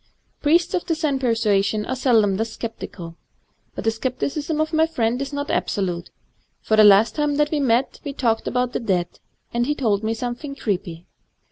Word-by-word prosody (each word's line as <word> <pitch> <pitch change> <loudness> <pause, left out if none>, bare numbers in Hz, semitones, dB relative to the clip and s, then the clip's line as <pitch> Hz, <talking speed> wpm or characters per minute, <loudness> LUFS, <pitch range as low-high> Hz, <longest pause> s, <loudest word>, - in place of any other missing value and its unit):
Priests 330 +4 +3
of 360 - 0
the 330 - +1
Zen 305 -4 0
persuasion 215 -4 +1
are 260 - -2
seldom 225 -7 +3
thus 225 +1 -3
sceptical. 175 -7 -7 0.6
But - - -5
the 225 - +2
scepticism 275 +6 -3
of 310 +1 -1
my 320 +1 +4
friend 245 -4 -1
is 275 0 -4
not 285 0 -3
absolute; 180 -4 -1 0.5
for 220 - +1
the 215 - +7
last 210 +2 +6
time 295 -1 0
that 295 0 +1
we 305 - +1
met 255 -1 +1
we 285 - -4
talked 235 -5 0
of 250 0 0
the - - -2
dead, 180 -6 -1 0.3
and 240 +1 0
he 295 - 0
told 220 -7 0
me 220 +1 0
something 245 +4 -5
creepy. 180 -8 -3
240 Hz, 190 wpm, -22 LUFS, 215-285 Hz, 0.6 s, the